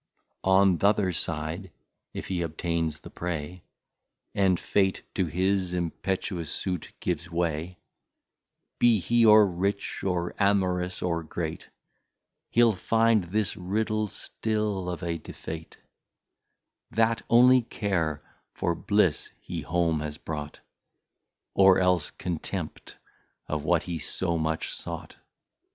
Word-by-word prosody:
On 95 -2 +5
th'other 100 -2 +3
side, 80 +3 -2 0.4
if - - -6
he 90 -2 -1
obtains 80 -1 -2
the - - -11
Prey, 85 0 -4 0.7
And 95 -3 +3
Fate 95 -2 +1
to 95 -3 0
his 95 +2 0
impetuous 85 -1 -2
Sute 90 -4 -3
gives 85 -1 -2
way, 85 +1 -2 1.0
Be 120 -3 +5
he 115 +6 +2
or 105 0 +8
Rich, 100 +2 -2
or 90 -2 -1
Amorous, 90 -3 +1
or 85 -2 0
Great, 80 0 -5 0.8
He'll 120 -1 +5
find 115 +1 +2
this 100 +2 -1
Riddle 110 +3 -1
still 105 -3 -2
of 90 0 -5
a 85 -1 -2
Defeat, 80 +1 -8 1.1
That 115 +1 +2
only 125 +2 +7
Care, 90 -10 -2 0.3
for 85 - 0
Bliss, 95 -1 +1
he - - -5
home 85 -2 +1
has 75 0 -4
brought, 75 -2 -6 0.9
Or 95 -1 +6
else 90 -4 +2
Contempt 85 -3 -5 0.5
of 75 -1 -3
what 85 -1 +3
he 85 -2 -4
so 85 +3 -2
much 80 0 -1
sought. - - -7
90 Hz, 115 wpm, -27 LUFS, 85-100 Hz, 1.1 s, or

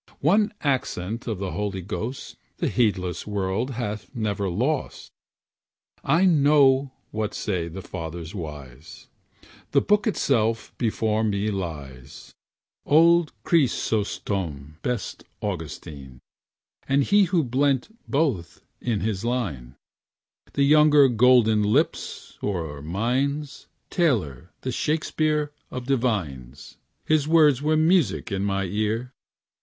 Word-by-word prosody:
One 205 +9 +3
accent 115 - -2
of 110 -4 -2
the 95 0 -4
Holy 100 -3 -3
Ghost 110 +7 -5 0.2
The - - 0
heedless 95 -8 0
world 100 +4 -1
hath 105 -3 -4
never 100 -4 -1
lost. 130 - -2 0.9
I 165 +7 +3
know 140 -5 +4 0.2
what 105 -1 -3
say 90 -5 -2
the 90 +3 -8
fathers 85 -1 -6
wise, 75 - -9 0.6
The - - +5
Book 210 +2 +2
itself 115 - 0
before 110 -2 0
me 105 0 0
lies, 70 -9 -7 0.5
Old 165 +2 +4
Chrysostom, 100 - -1
best 125 -3 -3 0.2
Augustine, 75 -8 -6 0.7
And 140 +1 +3
he 200 +6 +4
who 170 -2 +1
blent 135 - 0
both 135 - -1 0.2
in 115 -5 -1
his 105 -2 -2
line, 85 - -3 0.8
The 140 - +2
younger 150 -1 +6
Golden 120 -2 +4
Lips 115 +10 -1
or 80 -8 -3
mines, 130 - -2 0.2
Taylor, 95 - 0
the 130 - -3
Shakespeare 155 +1 0 0.2
of 125 -1 -6
divines. 95 - -2 0.3
His 155 -2 +2
words 155 -5 +5
are 155 +1 +2
music 160 - +2
in 100 0 -1
my 100 -1 0
ear. 110 +6 -2
110 Hz, 110 wpm, -24 LUFS, 95-140 Hz, 0.9 s, younger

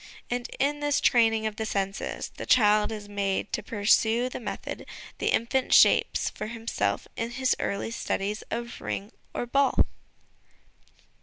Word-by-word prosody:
And 245 0 -2
in 290 +2 +1
this 290 -1 +1
training 225 -2 +3
of 215 -1 -3
the 220 - -2
senses, 195 -1 -3
the - - -6
child 210 -2 +4
is 210 -2 -6
made 200 -1 -2
to - - 0
pursue 225 +3 +2
the - - -6
method 240 - -6 0.3
the - - -1
infant 250 +3 +2
shapes - - +5
for 215 - -6
himself 230 0 -2
in 230 0 -2
his 260 +2 +1
early 200 +3 -2
studies 210 -2 -2
of 235 +1 -5
ring 200 +2 -4 0.2
or - - -1
ball. 275 +3 +3
225 Hz, 150 wpm, -27 LUFS, 210-245 Hz, 0.3 s, shapes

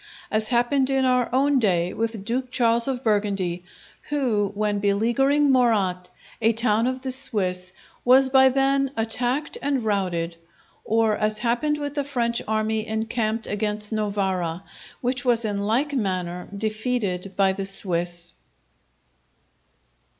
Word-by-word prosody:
As 215 0 +1
happened 260 +3 +2
in 270 -1 +2
our 250 -1 +2
own 275 +2 +3
day 180 -5 +1
with 225 -3 -3
Duke 250 +3 -2
Charles 235 -1 +2
of 265 -1 -2
Burgundy, 200 -5 0 0.5
who, 235 -9 0
when 210 0 0
beleaguering 240 +8 +2
Morat, 200 -8 +2 0.3
a 225 +1 +4
town 225 0 +2
of 255 0 -3
the 260 - -2
Swiss, 185 -9 -2 0.3
was 260 +2 +6
by 265 0 +6
them 275 +1 +2
attacked 245 +6 -1
and 275 -4 -1
routed; 175 -5 -1 0.5
or 220 -1 +2
as 215 0 0
happened 245 +6 0
with 290 -1 -4
the 290 -1 -1
French 240 -4 -1
army 220 0 -1
encamped 220 0 -1
against 210 +1 -2
Novara, 190 -5 -1 0.4
which 250 0 -1
was 235 -3 +2
in 200 -1 -2
like 270 +7 +1
manner 180 -7 -2
defeated 215 -3 -2
by 195 -1 +3
the 195 0 -4
Swiss. 175 -3 -3
220 Hz, 135 wpm, -24 LUFS, 200-255 Hz, 0.5 s, was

